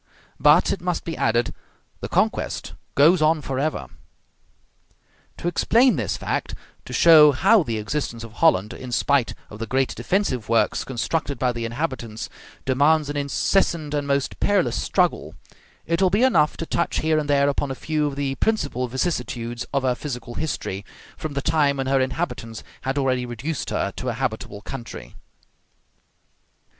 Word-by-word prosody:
But, 150 Hz, +4 st, +5 dB
it 195 Hz, -, -2 dB
must 180 Hz, -1 st, -2 dB
be 165 Hz, -, -4 dB
added, 120 Hz, +1 st, +1 dB, 0.5 s
the -, -, -6 dB
conquest -, -, -1 dB, 0.2 s
goes 160 Hz, +5 st, +5 dB
on 155 Hz, +1 st, +3 dB
forever. 135 Hz, +4 st, -2 dB, 1.5 s
To -, -, -4 dB
explain 235 Hz, +6 st, +3 dB
this 120 Hz, -, -2 dB
fact -, -, -3 dB, 0.3 s
to -, -, -9 dB
show 150 Hz, +3 st, +7 dB
how 195 Hz, +10 st, +5 dB
the 115 Hz, -8 st, -2 dB
existence 115 Hz, +1 st, -3 dB
of 115 Hz, -1 st, -10 dB
Holland, 110 Hz, -, +2 dB
in 125 Hz, -1 st, -8 dB
spite 130 Hz, -1 st, +1 dB, 0.2 s
of 105 Hz, -, -9 dB
the 115 Hz, -, -4 dB
great 130 Hz, +2 st, 0 dB
defensive 125 Hz, -, -1 dB
works 115 Hz, -1 st, +2 dB
constructed 140 Hz, +3 st, -2 dB
by 125 Hz, -1 st, +1 dB
the 120 Hz, -1 st, -4 dB
inhabitants, 120 Hz, -3 st, -4 dB, 0.4 s
demands 145 Hz, +3 st, +3 dB
an -, -, -6 dB
incessant 150 Hz, +2 st, 0 dB
and 145 Hz, -1 st, -1 dB
most 140 Hz, -1 st, -1 dB
perilous 185 Hz, -, +1 dB
struggle -, -, 0 dB, 0.5 s
it 170 Hz, +2 st, 0 dB
will 190 Hz, -, +5 dB
be 205 Hz, +7 st, +2 dB
enough 155 Hz, -, +3 dB
to 165 Hz, -, -4 dB
touch 170 Hz, -, -1 dB
here 155 Hz, 0 st, +2 dB
and 150 Hz, -1 st, -4 dB
there 140 Hz, -1 st, +4 dB
upon 145 Hz, 0 st, 0 dB
a 135 Hz, -, -3 dB
few 155 Hz, +1 st, -1 dB
of 140 Hz, -, -4 dB
the 140 Hz, -1 st, -1 dB
principal 140 Hz, -, -1 dB
vicissitudes 120 Hz, -4 st, -3 dB
of 140 Hz, -1 st, 0 dB
her 130 Hz, -1 st, +2 dB
physical 125 Hz, -3 st, -6 dB
history, 110 Hz, -10 st, -3 dB, 0.3 s
from 155 Hz, -2 st, -5 dB
the 140 Hz, -1 st, -3 dB
time 150 Hz, -3 st, +2 dB
when 135 Hz, -, -2 dB
her 135 Hz, 0 st, +2 dB
inhabitants 130 Hz, -5 st, -3 dB, 0.2 s
had 135 Hz, +2 st, -2 dB
already 130 Hz, -2 st, +1 dB
reduced 130 Hz, +6 st, -4 dB
her -, -, -1 dB
to -, -, -3 dB
a -, -, -1 dB
habitable 100 Hz, 0 st, -4 dB
country. 120 Hz, +1 st, -8 dB
140 Hz, 165 wpm, -23 LUFS, 125-160 Hz, 1.5 s, show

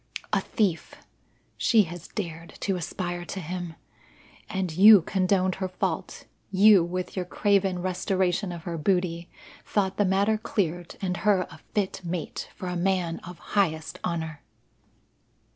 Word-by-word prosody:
A -, -, +3 dB
thief 195 Hz, -7 st, -1 dB, 0.6 s
she 225 Hz, -3 st, +4 dB
has 175 Hz, -1 st, -8 dB
dared 165 Hz, -4 st, -6 dB
to 195 Hz, -, 0 dB
aspire 175 Hz, 0 st, -4 dB
to 190 Hz, -, -5 dB
him! 175 Hz, -1 st, -5 dB, 0.7 s
And 190 Hz, -3 st, -2 dB
you 200 Hz, 0 st, +9 dB
condoned 185 Hz, 0 st, +1 dB
her 190 Hz, -, +1 dB
fault. 185 Hz, -, -3 dB, 0.2 s
You, 200 Hz, -1 st, +6 dB
with 180 Hz, +1 st, -4 dB
your 185 Hz, -, -1 dB
craven 195 Hz, -1 st, +1 dB
restoration 185 Hz, 0 st, 0 dB
of 170 Hz, -2 st, -7 dB
her 170 Hz, -2 st, -4 dB
booty, 175 Hz, 0 st, 0 dB, 0.3 s
thought 195 Hz, -2 st, 0 dB
the 205 Hz, -, +4 dB
matter 200 Hz, +3 st, +2 dB
cleared 175 Hz, -6 st, -2 dB
and 180 Hz, -1 st, -1 dB
her 195 Hz, +1 st, +3 dB
a 150 Hz, -, -12 dB, 0.2 s
fit 200 Hz, -3 st, -1 dB
mate 170 Hz, -2 st, -4 dB
for 185 Hz, -, -6 dB
a 180 Hz, -, -2 dB
man 175 Hz, -2 st, 0 dB
of 180 Hz, -1 st, -10 dB, 0.2 s
highest 160 Hz, -6 st, 0 dB
honour." 160 Hz, -4 st, -3 dB
180 Hz, 145 wpm, -26 LUFS, 170-195 Hz, 0.7 s, you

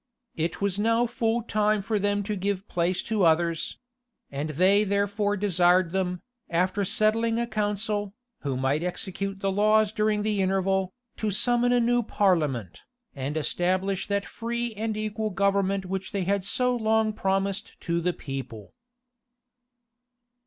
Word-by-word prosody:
It 165 Hz, +1 st, -2 dB
was 200 Hz, 0 st, 0 dB
now 230 Hz, +3 st, +3 dB
full 235 Hz, -1 st, -1 dB
time 215 Hz, -2 st, +1 dB
for 215 Hz, +1 st, 0 dB
them 205 Hz, 0 st, 0 dB
to 210 Hz, +1 st, -3 dB
give 200 Hz, 0 st, -2 dB
place 175 Hz, +1 st, 0 dB
to 220 Hz, -3 st, -1 dB
others; 165 Hz, 0 st, +2 dB, 0.5 s
and 140 Hz, +3 st, -3 dB
they 185 Hz, +7 st, +4 dB
therefore 205 Hz, +1 st, 0 dB
desired 180 Hz, -2 st, +3 dB
them, 180 Hz, -1 st, -2 dB, 0.3 s
after 185 Hz, +4 st, +1 dB
settling 225 Hz, +3 st, +1 dB
a 235 Hz, -, 0 dB
council, 210 Hz, -2 st, -2 dB, 0.2 s
who 135 Hz, -3 st, -3 dB
might 135 Hz, +4 st, 0 dB
execute 195 Hz, +2 st, -3 dB
the 195 Hz, -1 st, 0 dB
laws 215 Hz, +1 st, +3 dB
during 210 Hz, -1 st, +1 dB
the 210 Hz, -2 st, 0 dB
interval, 190 Hz, 0 st, +1 dB, 0.3 s
to 215 Hz, -, -1 dB
summon 240 Hz, +4 st, +3 dB
a 245 Hz, -, +4 dB
new 240 Hz, +1 st, +2 dB
parliament, 150 Hz, -, 0 dB, 0.3 s
and 140 Hz, +3 st, -3 dB
establish 185 Hz, +4 st, 0 dB
that 200 Hz, -1 st, -1 dB
free 235 Hz, 0 st, -3 dB
and 215 Hz, 0 st, -3 dB
equal 215 Hz, 0 st, -2 dB
government 195 Hz, 0 st, +1 dB
which 190 Hz, +1 st, -4 dB
they 200 Hz, -2 st, 0 dB
had 200 Hz, +1 st, 0 dB
so 250 Hz, +5 st, +1 dB
long 220 Hz, -1 st, +1 dB
promised 195 Hz, 0 st, -1 dB
to 170 Hz, 0 st, -1 dB
the 180 Hz, +1 st, +1 dB
people. 135 Hz, -, -7 dB
200 Hz, 145 wpm, -26 LUFS, 180-215 Hz, 0.5 s, they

